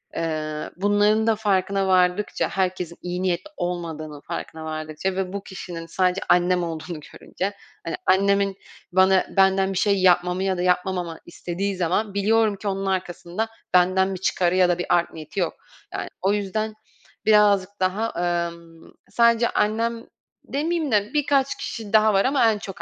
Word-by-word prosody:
eee, 155 -2 -3
bunların 205 +3 +3
da 225 - +4
farkına 195 -2 0
vardıkça 185 +2 +2
herkesin 180 -3 -2
iyi 180 +1 -4
niyetli 185 - -1
olmadığının 160 -4 -4
farkına 160 0 -6
vardıkça 155 +4 -3
ve 190 0 -2
bu 200 0 -4
kişinin 175 -3 -7
sadece 180 +2 0
annem 180 0 +3
olduğunu 160 -1 -5
görünce. 195 +2 -4 0.3
Hani, 165 - -2
annemin 195 +1 +2 0.3
bana 190 +1 +4
benden 190 0 +4
bir - - -3
şey 200 0 +2
yapmamı 180 0 +3
ya 190 -1 0
da - - -2
yapmamamı 180 -2 0
istediği 180 +3 -4
zaman 185 +4 0
biliyorum 215 +1 +2
ki 205 - -7
onun 195 0 -2
arkasında 185 +2 -2 0.2
benden 185 +2 +3
bir 180 - -7
çıkarı 180 -2 +1
ya 180 -1 +4
da 175 - +2
bir 175 - -3
art 175 -1 +2
niyeti 155 +4 -7
yok. 175 - 0 0.4
Yani, - - -4
o 195 +2 +2
yüzden 215 +2 -2 0.5
birazcık 205 -3 +5
daha, 195 +5 0 0.4
emm, 170 -1 -14 0.2
sadece 235 0 +3
annem 230 +2 0 0.4
demeyeyim 315 +1 -1
de 210 -1 +1
birkaç 280 -2 +2
kişi 220 -2 -6
daha 215 0 +5
var 195 0 +3
ama 260 -4 +4
en 210 - -2
çok 195 -4 -8
190 Hz, 160 wpm, -23 LUFS, 175-205 Hz, 0.5 s, birazcık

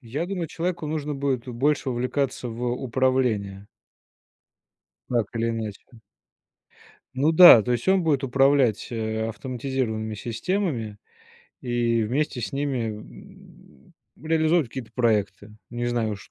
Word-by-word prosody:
Я 140 +6 -4
думаю, 180 -4 -3
человеку 170 -2 -3
нужно 150 -1 -3
будет 135 -3 -2
больше 135 +3 0
увлекаться 125 +1 -2
в 115 +2 -5
управление. 125 -6 -1 1.4
Так 120 -4 0
или 115 0 0
иначе. 110 -3 -5 1.3
Ну 145 +4 +3
да, 165 - +9
то 125 - -4
есть 120 - -1
он 190 -1 +3
будет 145 -4 +1
управлять, 135 -3 +2
э, 110 -1 -2
автоматизированными 120 -3 -3
системами, 115 - -3 0.6
и 120 -2 0
вместе 130 +3 -1
с - - -4
ними, 135 -4 -1
м, 105 - -16 0.3
реализовывать 160 -2 +2
какие-то 120 -1 -8
проекты. 105 -3 0 0.2
Не 120 0 -4
знаю 120 -3 -1
уж 100 - -10
125 Hz, 120 wpm, -24 LUFS, 115-145 Hz, 1.4 s, да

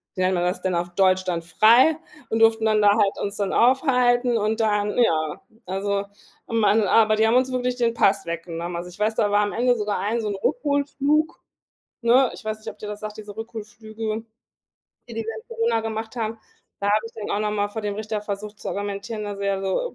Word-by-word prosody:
wie 185 - -2
nennt 185 +1 +2
man 175 - 0
das 180 +1 -1
denn, 185 -1 -1
auf 175 +1 -1
deutsch 185 -1 +3
dann, 170 -2 -2
frei 230 - +5 0.3
und 225 - 0
durften 225 0 +4
dann 215 -1 +3
da 205 - +6
halt 200 -3 +2
uns 200 0 -3
dann 200 -2 -1
aufhalten 250 -2 +3
und 215 +2 0
dann 210 -1 +1
ja, 155 -10 +1 0.2
also, 200 +2 -1 0.4
am 230 -1 0
an 215 +2 +4
aber 215 +2 +4
die 220 - +3
haben 230 - +3
uns 260 0 +1
wirklich 250 0 -1
den 235 -1 +1
Pass 200 -3 +2
weggenommen, 170 +1 -5
also, 175 +1 -5
ich 180 - -15
weiß, 220 +1 +1
da 205 -2 +1
war 205 - +4
am 205 - -1
Ende 245 +1 +2
sogar 210 -1 -1
ein 220 +4 -1
so 215 - -3
'n 200 - -2
Rückholflug, 285 - 0 0.6
ne? 245 +2 +4
Ich - - -11
weiß 215 0 -3
nicht, 220 - -7
ob 210 - -22
dir 210 - -7
das 210 0 -6
sagt, 215 0 -6
diese 210 -1 -9
Rückholflüge, 220 -1 -9 1.1
die 235 - -8
die 225 - -2
wir 225 0 -5
in 220 - -11
Corona 230 0 0
gemacht 220 0 -5
haben. 225 0 -3 0.4
Da 200 - -1
habe 215 +2 +2
ich 225 - -11
dann 215 -2 -6
auch - - 0
noch 210 - 0
mal 205 0 0
vor 220 +2 -5
dem 205 -1 -2
Richter 215 0 -3
versucht 210 0 -6
zu - - -6
argumentieren, 205 +2 -4
dass 205 -1 -5
er 200 -1 -1
so: 195 - -1
215 Hz, 230 wpm, -23 LUFS, 200-230 Hz, 1.1 s, da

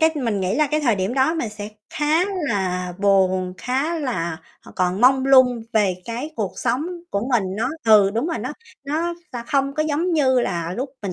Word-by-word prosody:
cái 320 0 +5
mình 230 -8 -1
nghĩ 185 +3 0
là 300 +2 +3
cái 305 +2 0
thời 240 -7 +2
điểm 190 +6 -2
đó 270 +5 +2
mình 245 -9 -2
sẽ 210 0 -7 0.2
khá 305 +4 +1 0.2
là 180 -3 -1
buồn, 185 -2 +2
khá 275 - -1
là, 170 - -3 0.2
ờ, - - -14
còn 185 +1 0
mông 265 +2 +4
lung 255 -3 +5
về 205 -4 +2
cái 240 +7 -5
cuộc 205 -4 -2
sống 250 +5 -1 0.2
của 200 +5 -1
mình, 225 -5 +3
nó 235 +4 0 0.2
ừ, 210 -3 +6
đúng 230 +8 -1
rồi. 335 - -2
Nó 255 +6 -4 0.3
nó 325 +4 -1 0.2
sa 240 -1 -5
không 275 -2 0
có 310 - +1
giống 315 +4 0
như 260 -5 +3
là 170 -5 -2
lúc 260 +2 -3
mình 195 -3 -3
240 Hz, 210 wpm, -22 LUFS, 195-285 Hz, 0.3 s, ừ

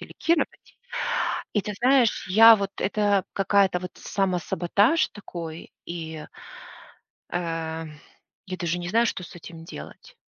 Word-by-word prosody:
делегировать. 335 0 -2 0.8
И 210 - +2
ты 210 - -5
знаешь, 255 -5 +3
я 225 +3 +9
вот 200 -1 -3
это 205 -1 +2
какая-то, 195 -2 +3
вот 180 0 -7
самосаботаж 195 - +1
такой, 170 -5 -8
и 160 -2 -6 1.1
э, 165 -2 -3 0.6
я 185 0 -5
даже 175 0 -1
не 175 - -5
знаю, 230 +5 +3
что 185 - -3
с 175 - -11
этим 165 -1 -11
делать. - - -11
185 Hz, 120 wpm, -25 LUFS, 170-210 Hz, 1.1 s, я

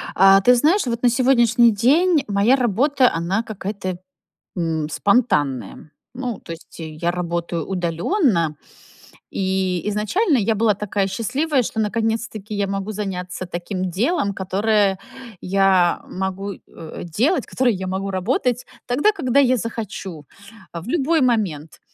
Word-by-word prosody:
А 195 +1 +6
ты 250 +4 +5
знаешь, 315 - +3
вот 235 +1 -3
на 245 - +6
сегодняшний 240 -2 +4
день 290 - +3
моя 205 +6 +3
работа, 255 +3 +2
она 185 +7 -1
какая-то, 195 -3 -5 0.6
м, 160 -3 -1
спонтанная. 150 - 0 0.2
Ну, 245 -4 -4
то - - -9
есть, 165 +1 -11
э, 160 - -6
я 155 +3 -2
работаю 170 -2 -3
удалённо, 175 - 0 0.7
и 190 -1 -1
изначально 265 - +1
я 220 +1 +1
была 215 0 +3
такая 200 -1 -1
счастливая, 265 +8 0
что 220 - -4
наконец-таки 220 -1 -2
я 200 0 0
могу 195 +2 -3
заняться 185 -2 -4
таким 180 +1 -4
делом, 205 - 0
которое 195 +1 +1 0.4
я 190 -2 +2
могу, 190 +1 -4
э, 160 -4 -10
делать, 250 - 0
которое 250 -3 +1
я 190 0 -5
могу 190 +1 -3
работать 240 +6 -1 0.2
тогда, 290 +13 +3
когда 280 - +1
я 255 -2 +4
захочу. 200 -8 -6 0.5
А, 170 - -6
в 200 - -12
любой 320 +2 +1
момент. 195 - -1
205 Hz, 135 wpm, -21 LUFS, 185-245 Hz, 0.7 s, А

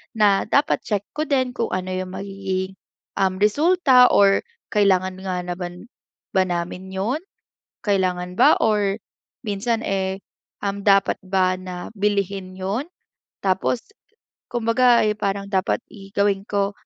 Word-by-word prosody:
na 205 -3 +4
dapat 280 - +2
check 205 -2 -1
ko 305 - 0
din 260 -3 +1
kung 230 - -1
ano 185 0 -3
yung 185 0 -4
magiging, 195 -1 -3 0.5
um, 190 -1 +2
resulta 265 - +5
or 195 -1 +5 0.4
kailangan 190 -2 +3
nga 185 -2 -2
naman 175 +2 -6 0.5
ba 190 - +5
namin 175 +1 -3
'yon? 205 +10 -1 0.7
Kailangan 180 -3 0
ba - - +6
or 210 -2 +2 0.5
minsan, 220 +3 -1
eh, 190 0 -1 0.4
um, 200 0 -2
dapat 195 -1 +4
ba 185 -1 +2
na 180 -1 -7
bilhin 200 -2 -1
'yon? 195 +8 -2 0.6
Tapos 195 +5 +1 0.7
kumbaga, 240 +1 +3
eh, 215 - +2
parang 200 -2 -2
dapat 190 -1 +1 0.2
i 195 -2 -12
gawin 200 -1 +2
ko, 200 -1 +1
195 Hz, 130 wpm, -22 LUFS, 185-210 Hz, 0.7 s, ba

